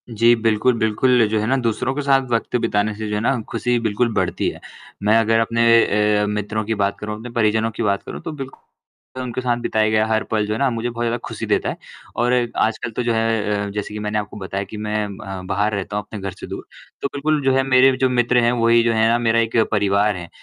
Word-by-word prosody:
जी, 115 +1 +4
बिल्कुल, 115 +2 +2
बिल्कुल, 115 +2 +3
जो 110 0 +1
है 105 - -1
ना 130 - +2
दूसरों 120 +1 -1
के 145 - -2
साथ 135 -1 +3
वक़्त 115 +1 -1
बिताने 105 +1 0
से 110 +1 -5
जो 105 - -1
है - - 0
ना 130 +3 +1
खुशी 120 +1 0
बिल्कुल 115 +1 0
बढ़ती - - -1
है। - - -9 0.4
मैं 105 +2 +4
अगर 115 0 +3
अपने 115 +1 0 0.6
ए - - +1
मित्रों 105 +1 -2
की 110 +1 -1
बात 100 -1 0
करूँ, 105 0 -4
अपने 115 +3 -8
परिजनों 110 -1 +1
की 115 - -4
बात 100 -2 0
करूँ - - -8
तो 165 - -5
बिल्कु 135 -3 -8 0.6
उनके 125 0 -4
साथ 120 -1 0
बिताया 110 -2 +1
गया 110 0 +2
हर 110 0 +1
पल 110 -1 +1
जो 105 - -1
है 110 - -3
ना 140 -1 +2
मुझे 115 +1 -2
बहुत 120 0 -4
ज़्यादा 115 +1 0
खुशी - - -5
देता - - 0
है। - - -5 0.4
और 120 +1 +1 0.2
आजकल 115 +1 0
तो 125 - -1
जो 120 -1 +1
है 110 -2 0
अ, - - -5
जैसे 105 +1 -5
कि 105 - -5
मैंने 105 0 -2
आपको 105 0 -7
बताया 100 0 -4
कि 105 - -9
मैं 105 0 -2
म 95 -2 -8
बाहर 105 +3 0
रहता 100 +1 -4
हूँ 105 - -2
अपने 105 - -8
घर 95 0 -4
से 90 - -10
दूर, - - -7 0.4
तो - - 0
बिल्कुल 150 +1 0
जो 135 - +4
है, 135 - +3
मेरे 130 0 +5
जो 130 0 +2
मित्र 125 0 +2
हैं 120 - +3
वो 115 -1 +1
ही 115 0 +5
जो 115 -1 +2
है 110 0 +3
ना, 115 - +3
मेरा 115 -1 +2
एक 115 0 0
परिवार 100 0 +2
है। 85 -1 -8
110 Hz, 255 wpm, -20 LUFS, 105-120 Hz, 0.6 s, मेरे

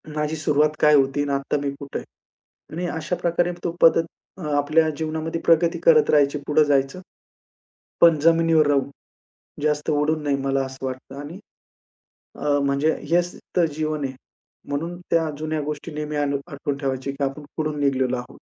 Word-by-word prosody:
माझी 150 +1 -1
सुरुवात 150 -1 +2
काय 150 0 +6
होती 135 0 +2
आणि 145 - -2
आत्ता 140 +1 -1
मी 140 - 0
कुठे 140 -1 -5
आहे. - - -11 0.7
आणि 175 +2 -3
अशा 160 +3 -2
प्रकारे 175 +1 +1
तो 170 - -1
पद्धत 165 0 +6 0.3
अ, - - -10 0.2
आपल्या 155 +3 +3
जीवनामध्ये 160 +1 -3
प्रगती 165 0 +3
करत 465 -3 +6
राहायची 145 0 +3
पुढं 150 +1 +4
जायचं. 140 +3 +1 1.0
पण 165 -2 +6
जमिनीवर 165 -1 +4
राहून, 140 -1 +1 0.7
जास्त 150 0 0
उडून 150 +1 +1
नाही 140 -1 +1
मला 135 0 +1
असं 130 0 -7
वाटतं. 130 +1 -7
आणि 150 +6 -8 1.0
अ, 145 -1 +1
म्हणजे 140 +3 +1
हेच 175 +1 +1 0.2
तर 175 - +5
जीवन 155 -1 -2
आहे. 130 - -4 0.6
म्हणून 165 +5 -3
त्या 165 -1 +2
जुन्या 155 0 -2
गोष्टी 150 +2 -5
नेहमी 150 0 -4
आम्ही 145 -1 0
आठवून 140 -2 -4
ठेवायची, 135 -1 -2
की 140 +1 -4
आपण 135 +2 -3
कुठून 155 -1 -2
निघालेलो 130 -3 +1
आहोत. 125 - -9
150 Hz, 165 wpm, -23 LUFS, 140-160 Hz, 1.0 s, काय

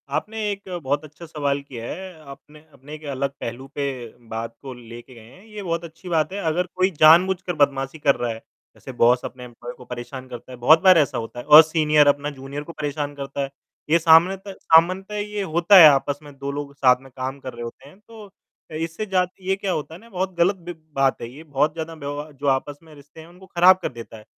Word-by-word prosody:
आपने 220 +1 -3
एक 200 -1 -8
बहुत 145 +3 -1
अच्छा 155 +3 -13
सवाल 145 -3 -2
किया 125 -5 -9
है। 185 -2 -9
आपने 150 +2 -14
अपने 145 +3 -13
एक 155 - -13
अलग 135 +1 -2
पहलू 120 +3 -6
पे 140 - -2 0.4
बात 115 +1 -5
को 135 -2 -8
लेके 120 +1 -12
गए 115 - -13
हैं 185 +10 -18
ये 210 -2 -9
बहुत 170 -2 -2
अच्छी 170 +2 -11
बात 165 +1 0
है 200 - -4
अगर 180 +3 -1
कोई 185 +1 +2
जानबूझकर 180 +3 +5
बदमाशी 140 0 0
कर 140 -2 +3
रहा 120 -1 -2
है 110 - -6 0.4
जैसे - - -10
बॉस 125 +1 +4
अपने 125 -1 -8
एम्प्लॉयी 120 0 -10
को 125 - -14
परेशान 125 +2 -8
करता 125 +1 -10
है 125 - -9
बहुत 155 +7 +5
बार 185 -2 +7
ऐसा 145 -5 +1
होता 115 +1 -6
है 120 - -8
और 150 +1 +10
सीनियर 155 -2 +3
अपना 145 +1 +2
जूनियर 140 +1 -8
को 170 - -10
परेशान 145 -1 -4
करता 140 0 -5
है। 135 - -5 0.4
ये 165 +2 +4
सामने 165 +3 +5
त 195 - -7
सामान्यता 185 +5 +3
ये 210 0 -4
होता 175 +4 +4
है 165 -4 +11
आपस 140 0 0
में 145 -1 -12
2 140 +1 -4
लोग 140 0 -6
साथ 125 -2 +3
में 135 - -15
काम 130 +2 -5
कर 130 -2 -8
रहे 120 0 -8
होते 125 +4 -10
हैं 185 - -20
तो 225 -2 -12 0.5
अ, - - -10
इससे 165 +6 -4
जात 185 -3 0
ये 190 +1 0
क्या 195 -1 -3
होता 160 -2 -4
है 165 - -10
ना, 230 - -17
बहुत 190 -2 -3
ग़लत 175 +4 +3
बि 175 -1 -9 0.2
बात 135 -1 +1
है 115 - -6
ये, 145 +5 -12
बहुत 150 0 0
ज़्यादा 165 0 -6
व्यव 145 0 -6
जो 145 - -3
आपस 140 +2 0
में 160 -1 -16
रिश्ते 145 +2 -17
हैं, 160 - -14
उनको 180 +2 -16
ख़राब 185 +1 +5
कर - - -2
देता 115 -2 -10
है। 110 - -14
150 Hz, 240 wpm, -22 LUFS, 135-175 Hz, 0.5 s, है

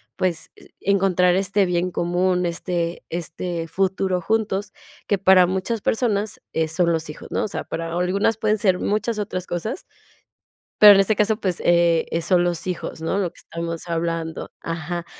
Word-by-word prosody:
pues, 175 -3 -2
eh, - - -18
encontrar 185 -2 +2
este 195 +1 +2
bien 180 0 0
común, 180 +1 0
este 170 0 -2
este, 165 0 -4
futuro 190 +1 0
juntos 205 -1 -1 0.4
que 200 - +2
para 185 -1 +6
muchas 190 +4 -2
personas, 215 -3 0
eh, 160 -1 0
son 170 +1 +2
los 160 -1 -2
hijos, 150 - -9
¿no? - - 0
O - - -1
sea, - - -4
para 165 0 -4
algunas 200 +5 +1
pueden 215 0 +1
ser 190 -4 +2
muchas 215 +1 -1
otras 185 -3 -3
cosas 215 - -4 1.0
pero 210 -1 +11
en - - +4
este 200 +2 +3
caso, 210 +1 +2
pues, 185 -3 -1
eh, 170 -1 +3
eh, 165 - 0
son 180 0 +3
los 175 0 -1
hijos, 170 -2 -4
¿no?, 165 +4 -1
lo 180 -4 -1
que - - -17
estamos 165 +1 -6
hablando, 165 -1 -3
ajá. 165 +1 -4
180 Hz, 175 wpm, -22 LUFS, 170-200 Hz, 1.0 s, pero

